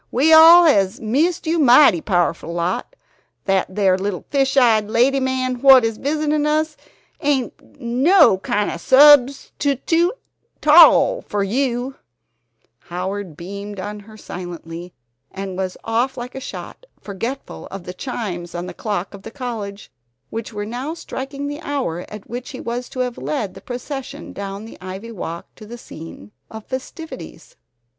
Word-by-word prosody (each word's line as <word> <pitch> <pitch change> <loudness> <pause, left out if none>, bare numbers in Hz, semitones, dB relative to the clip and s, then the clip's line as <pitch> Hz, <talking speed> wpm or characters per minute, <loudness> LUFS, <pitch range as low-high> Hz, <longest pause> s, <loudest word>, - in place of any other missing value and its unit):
We 295 +6 +3
all 330 +2 +9
hes 200 - +3
missed 290 +11 0
you 325 +1 0
mighty 250 - +6
powerful 175 -3 0
lot. 175 - -3 0.5
That 195 -1 +1
there 190 -1 +1
little 195 -1 -3
fish 275 -1 +1
eyed 220 -5 +4
lady 250 +5 +3
man 255 -1 -1
wot 265 -2 +8
is 225 -1 -2
visitin' 300 +1 0
us 310 0 0 0.5
ain't 285 -2 -2
no 260 - +4
kind 205 +1 -1
of - - -5
substoote 285 - +4 0.5
'tall 345 +10 +6
fer 205 -1 -2
you 250 +4 -2 0.4
" 115 -1 -47
Howard 185 -1 -5
beamed 200 +3 -7
on 205 +2 -6
her 215 +1 -14
silently 175 -2 -8 0.4
and 190 -1 -6
was 185 -1 -4
off 245 +4 -1
like 245 +1 -6
a 265 - -6
shot, - - -9
forgetful 230 +7 -6
of 195 -2 -8
the 180 - -7
chimes 180 -6 -5
on 175 +1 -4
the 180 - -7
clock 200 -1 -4
of 200 - -10
the 225 - -9
college, 225 -6 -6 0.4
which 225 0 -5
were 205 -1 -5
now 255 +8 -5
striking 275 -3 -6
the 290 +2 -5
hour 260 - -3
at 210 -1 -10
which 245 +1 -6
he 260 - -8
was 240 +1 -5
to 255 - -4
have 250 -1 -3
led 155 - -3
the - - -12
procession 260 +2 -7
down 200 +1 -6
the 225 - -12
ivy 190 +5 -7
walk 170 -5 -6
to 215 - -13
the 240 +2 -8
scene 160 - -11 0.2
of 220 -1 -10
festivities. 320 - -8
230 Hz, 155 wpm, -20 LUFS, 195-275 Hz, 0.5 s, all